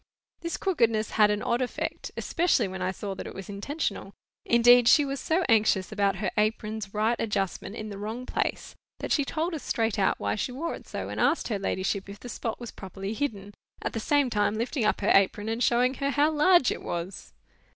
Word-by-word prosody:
This 335 0 -3
crookedness 230 - +1
had 210 -1 +4
an 210 0 -1
odd 235 +2 0
effect, 250 - -3
especially 325 - +1
when 190 0 -6
I 185 - 0
saw 195 +1 -4
that - - -7
it - - -9
was 195 0 -8
intentional; 205 -1 -4 0.3
indeed, 240 0 +6
she 295 +3 +6
was 275 0 -3
so 330 +6 +1
anxious 215 -4 +3
about 200 -2 +1
her 195 -1 -2
apron's 215 -1 -1
right 220 +3 +1
adjustment 200 -1 -2
in 215 -1 -6
the 200 -1 -7
wrong 220 +5 -5
place, - - -2 0.2
that - - -5
she 290 - +3
told 325 +5 -2
us 310 - -4
straight 225 -2 -1
out 190 - +2
why 100 0 -1
she 105 - -2
wore 295 +7 -3
it - - -10
so, - - -5
and - - -3
asked 330 - +2
her 210 -3 -1
ladyship 195 0 -2
if 200 +1 -9
the 245 - -9
spot 225 0 -4
was 240 -1 -7
properly 195 +2 -6
hidden, 205 -6 -3 0.3
at - - -4
the 225 - -2
same 285 +2 +2
time 205 -1 +1
lifting 235 +1 -1
up 210 - +1
her 205 - +2
apron 200 +2 +3
and 225 +2 -2
showing 245 +2 +3
her 275 +1 -2
how 290 +2 +3
large 315 -1 +4
it - - -4
was. 175 +3 -5
220 Hz, 215 wpm, -27 LUFS, 200-255 Hz, 0.3 s, indeed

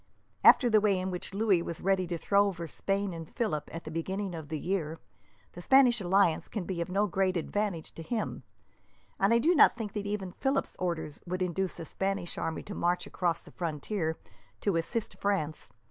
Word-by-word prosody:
After 250 - +8
the 215 -2 +5
way 200 -2 +3
in 185 +1 -2
which 180 - -4
Louis 200 -3 +2
was 170 0 -5
ready 190 -1 +1
to 170 0 -2
throw 200 +4 +3
over 170 -4 -4
Spain 195 +3 -2
and 165 -1 -7
Philip 210 - -2
at 165 - -6
the 155 - -7
beginning 190 +4 -3
of 160 -3 -7
the 155 - -2
year, 165 -2 -2 0.5
the 175 - -9
Spanish 250 +1 +5
alliance 185 -2 +3
can 210 - -4
be 175 -1 -3
of 170 - -3
no 200 +3 +2
great 190 -2 +1
advantage 195 -1 -2
to - - -9
him, 220 +6 -3 0.8
and 195 +2 +3
I 230 - +6
do 315 +9 +4
not 295 -6 +6
think 215 -4 -4
that 205 -1 -3
even 200 -3 -3
Philip's 270 +8 -1
orders 170 -5 -3
would 185 +1 -1
induce 185 +1 -2
a 165 - -5
Spanish 195 0 -2
army 160 - -3
to 205 - -7
march 175 0 0
across 170 -2 -1
the - - -14
frontier 160 0 -2 0.4
to 200 -4 +1
assist 185 +7 -2
France. 175 -7 -1
185 Hz, 200 wpm, -30 LUFS, 170-205 Hz, 0.8 s, After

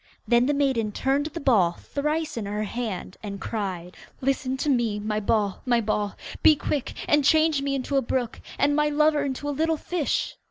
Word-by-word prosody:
Then 240 +1 +4
the 290 - +2
maiden 260 -7 +1
turned 275 +6 0
the 335 +2 -6
ball 205 - +3
thrice 300 - -2
in 220 -4 -4
her 210 +1 -2
hand, 210 -4 -4
and 200 -2 -6
cried, 185 -5 -4 0.2
'Listen 265 0 -1
to 285 - -2
me, 240 -6 +1
my 210 0 -1
ball, 205 -2 0
my 240 -2 +2
ball. 210 -2 -1 0.3
Be 310 - +7
quick 285 -1 -3
and 295 -1 +4
change 310 0 +4
me 275 0 -1
into 275 +1 -1
a - - +4
brook, 245 -1 -2 0.2
And 290 +1 +2
my 300 0 +2
lover 300 0 +3
into 280 +1 -3
a - - 0
little 320 +2 +1
fish. 335 -2 -1
265 Hz, 195 wpm, -25 LUFS, 215-290 Hz, 0.3 s, Be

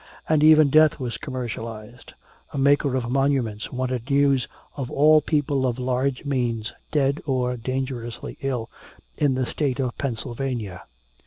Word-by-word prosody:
And 155 -1 +3
even 155 -2 +7
death 155 0 +5
was 125 -3 -4
commercialized. 115 -3 -6 0.4
A - - -4
maker 140 0 +3
of 120 -2 -2
monuments 130 -6 0
wanted 130 -1 -3
news 140 -3 +3 0.3
"of 135 -4 -4
all 155 +2 +5
people 145 -3 0
of 120 -1 -2
large 130 +2 -1
means, 120 -5 -1 0.2
dead 140 -1 +1
or 125 -2 0
dangerously 125 -1 -4
ill, 125 -4 -2 0.5
in 140 -3 +2
the 130 0 0
State 140 0 -2
of 125 -3 -1
Pennsylvania." 120 -5 -4
130 Hz, 140 wpm, -24 LUFS, 120-140 Hz, 0.5 s, even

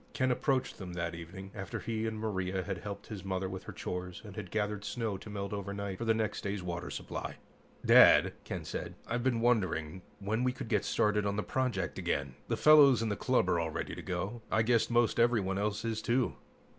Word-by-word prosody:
Ken 130 0 +1
approached 130 +1 0
them 90 -3 -6
that 85 -1 -2
evening, 85 +4 -8
after 95 -2 -5
he 115 -1 -2
and 110 -1 -3
Maria 95 -3 -2
had 95 +1 -4
helped 100 -1 -6
his 105 -4 -7
mother 95 0 -2
with 95 0 -6
her - - -6
chores 90 0 -5
and 100 -2 -9
had 105 -4 -6
gathered 105 0 -1
snow 115 -4 -2
to - - -10
melt 100 -1 -4
overnight 100 -1 -4
for 115 - -2
their 115 -1 +3
next 110 -2 -1
day's 100 -2 -3
water 85 -1 -4
supply. - - -5 0.5
"Dad," - - +8
Ken - - -5
said, - - -5
"I've 120 +1 -1
been 120 -2 +1
wondering 95 -8 +1 0.2
when 105 +4 -1
we 125 0 +2
could 120 - -7
get 105 -4 +1
started 105 -1 +2
on 100 - 0
the 105 - -1
project 125 -7 -1
again. 70 -2 -1
The - - 0
fellows 140 -6 +7
in 110 - 0
the 105 - 0
club 125 -6 +2
are 85 -2 +2
all 80 -1 -1
ready - - -4
to - - -6
go. 95 +5 -3
I 110 - +3
guess 115 0 +3
most 120 -1 +3
everyone 105 -5 +2
else 105 +1 -1
is, 110 -1 -1
too." 125 +1 +1
105 Hz, 220 wpm, -32 LUFS, 95-115 Hz, 0.5 s, Dad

